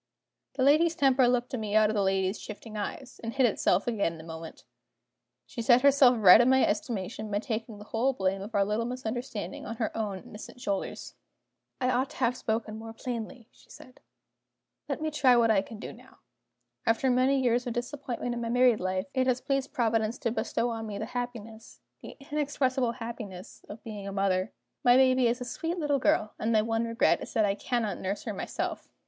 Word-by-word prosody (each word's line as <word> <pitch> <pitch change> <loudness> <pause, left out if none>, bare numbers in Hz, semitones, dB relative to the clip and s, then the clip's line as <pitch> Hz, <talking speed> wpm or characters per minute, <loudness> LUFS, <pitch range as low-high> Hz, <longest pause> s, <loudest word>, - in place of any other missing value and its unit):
The 260 - 0
lady's 320 +4 +4
temper 265 -2 +4
looked 245 0 0
at 255 - -1
me 210 -1 -3
out 215 0 +5
of - - -3
the 205 - +2
lady's 190 +1 0
shifting 215 +1 -9
eyes, 225 +5 -6
and 230 0 -4
hid 265 -2 +4
itself 200 -4 +2
again 210 -8 0
in - - -12
a - - -13
moment. 160 0 -9 0.8
She 130 - -6
set 240 +2 +5
herself 275 -3 +6
right 210 0 +8
in 245 - +3
my 265 0 +5
estimation 210 -1 -3
by 205 - 0
taking 220 0 -4
the 205 - -10
whole 230 +5 0
blame 190 -3 -1
of 210 +3 -7
our 200 -1 +3
little 210 +3 -1
misunderstanding 240 -5 -5
on 230 - -5
her 220 -2 -3
own 210 -3 -2
innocent 210 +3 -11
shoulders. 200 -6 -4 0.7
"I 255 -1 +1
ought 255 +2 0
to - - -13
have 250 -1 +1
spoken 220 -2 -3
more 225 0 -8
plainly," 235 0 -6
she - - -24
said. 255 - -14 0.9
"Let 310 - -3
me 310 - -1
try 265 -4 +4
what 230 -1 +4
I 200 -3 +4
can 220 +3 -10
do - - -8
now. - - -18 0.7
After 230 +3 +2
many 260 +2 +3
years 245 -1 +1
of 240 - -2
disappointment 245 -1 -4
in 240 - -4
my 230 - -3
married 245 -1 +4
life, 185 +1 -1
it 260 -1 +1
has 255 -1 +2
pleased 275 0 -2
Providence 225 -1 0
to 230 - 0
bestow 240 +1 -1
on 225 -1 -4
me 205 -1 -5
the 215 - -3
happiness 230 -2 -7 0.2
the - - -10
inexpressible 270 -4 0
happiness 225 -6 -8
of 210 +2 -9
being 210 -3 -7
a - - -4
mother. 195 -1 0 0.3
My 245 0 +6
baby 255 -1 +4
is 240 +2 -1
a - - -3
sweet 330 +8 -3
little 295 -4 +1
girl; 215 -4 +1
and 220 - 0
my 215 -1 +3
one 225 +1 0
regret 230 0 +2
is - - -7
that 220 -2 +3
I 200 - +1
cannot 225 0 -2
nurse 195 +2 -3
her - - -4
myself." - - -4
230 Hz, 210 wpm, -28 LUFS, 210-255 Hz, 0.9 s, right